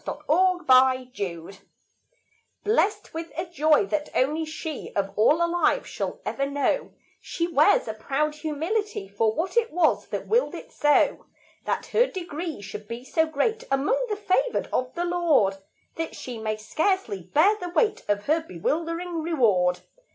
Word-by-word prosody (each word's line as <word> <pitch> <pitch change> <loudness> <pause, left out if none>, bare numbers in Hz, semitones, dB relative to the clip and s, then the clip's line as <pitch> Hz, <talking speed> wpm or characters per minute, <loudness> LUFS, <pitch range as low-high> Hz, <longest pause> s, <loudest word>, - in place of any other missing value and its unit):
The - - -3
Gift - - -18
of 360 +2 +3
God 255 - +2 1.1
Blessed 415 -1 +1
with 330 +1 -6
a 340 - -1
joy 315 0 +3
that 310 -5 -2
only 300 +5 +1
she 310 -1 -6
Of 195 -1 0
all 305 +10 +4
alive 350 +8 +1
shall - - -4
ever 275 0 -1
know, 285 - -1 0.3
She 335 - -2
wears 315 -7 +3
a 220 - -2
proud 280 +7 -1
humility 320 - -3
For 210 +3 +1
what 345 +10 -3
it 465 -1 +2
was 335 -1 +2
that - - -4
willed 475 +3 +1
it - - -10
so, 295 0 +2 0.4
That - - -1
her 485 +2 +4
degree 340 - -5
should 205 +1 -8
be 235 +2 -6
so 320 +4 +1
great 445 +8 -1
Among 340 - +1
the 420 - 0
favored 425 +4 0
of 255 0 0
the 350 0 -1
Lord 325 - +2 0.4
That 325 0 -4
she 245 -3 -7
may 215 -1 -2
scarcely 230 - -1
bear 320 - +3
the 355 - -5
weight 425 +4 +1
Of 205 0 0
her 315 +3 +2
bewildering 330 - -3
reward. 210 - +2
315 Hz, 160 wpm, -25 LUFS, 255-355 Hz, 1.1 s, all